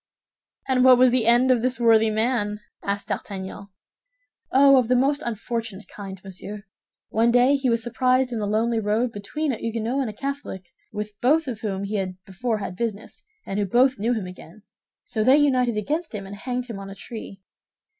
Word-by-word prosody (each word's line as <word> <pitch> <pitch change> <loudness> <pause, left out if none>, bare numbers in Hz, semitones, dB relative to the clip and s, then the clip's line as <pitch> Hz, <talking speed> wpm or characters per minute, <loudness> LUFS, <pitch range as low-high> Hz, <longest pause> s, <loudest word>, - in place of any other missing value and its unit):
"And 255 -1 +3
what 255 -1 +8
was 255 0 +5
the 240 -3 +2
end 240 +2 +5
of 245 -3 +3
this 255 +1 0
worthy 225 -2 +5
man?" 215 -1 0 0.2
asked 200 0 -3
D'Artagnan. 195 0 -5 0.8
"Oh, 275 0 +6
of 250 -3 +3
the 250 - +3
most 280 +4 +2
unfortunate 230 -2 -4
kind, 195 -2 -9
monsieur. 195 +2 -7 0.5
One 225 +2 +2
day 245 +3 +5
he 270 -2 0
was 230 -1 +1
surprised 255 +2 +1
in 230 - -2
a 205 - -1
lonely 225 +2 +1
road 220 +3 0
between 270 +9 -3
a 235 - -3
Huguenot 230 +3 -2
and 255 - -2
a - - -7
Catholic, 275 -7 -5 0.3
with 210 0 -5
both 300 +5 +3
of 230 -5 -5
whom 195 -3 -3
he 205 +1 -2
had 185 -2 -3
before 220 +4 -2
had 200 -3 -5
business, 220 0 -5 0.2
and 195 - -3
who 205 - +1
both 255 +4 +3
knew 230 +4 +1
him 215 -4 -3
again; 180 +2 -12 0.4
so 215 - -2
they 260 +5 +6
united 255 -6 +2
against 300 - -2
him 200 -2 -5
and 195 +1 -8
hanged 250 +3 -4
him 230 -5 -7
on 195 0 -8
a 195 - -9
tree. 195 -1 -9
230 Hz, 195 wpm, -24 LUFS, 205-255 Hz, 0.8 s, what